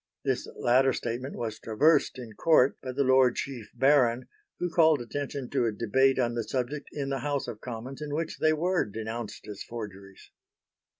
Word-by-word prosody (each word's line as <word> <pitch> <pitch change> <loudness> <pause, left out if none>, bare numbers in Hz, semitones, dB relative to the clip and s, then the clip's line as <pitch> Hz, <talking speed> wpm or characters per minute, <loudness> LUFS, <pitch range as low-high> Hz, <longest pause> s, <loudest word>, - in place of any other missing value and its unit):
This - - -1
latter 130 +2 +3
statement 120 +4 -4
was 115 -2 -4
traversed 140 +7 +2
in 120 -4 -8
Court 140 +2 +4
by 130 - -5
the 140 +2 0
Lord 130 -2 +4
Chief 125 -6 -5
Baron, 130 -3 +3 0.3
who 180 - -1
called 160 -3 +5
attention 135 +2 -4
to 130 -4 +1
a - - 0
debate 130 +5 +2
on 120 -2 +1
the 115 -1 -2
subject 135 +5 -3
in 140 -2 -3
the 135 -1 -1
House 145 +1 -2
of 105 - -7
Commons 125 +3 -7
in 150 -1 -5
which 160 +1 -3
they 155 - +4
were 175 +4 +1
denounced 110 +1 -6
as 105 -2 -8
forgeries. 100 -4 -9
130 Hz, 180 wpm, -28 LUFS, 115-140 Hz, 0.3 s, called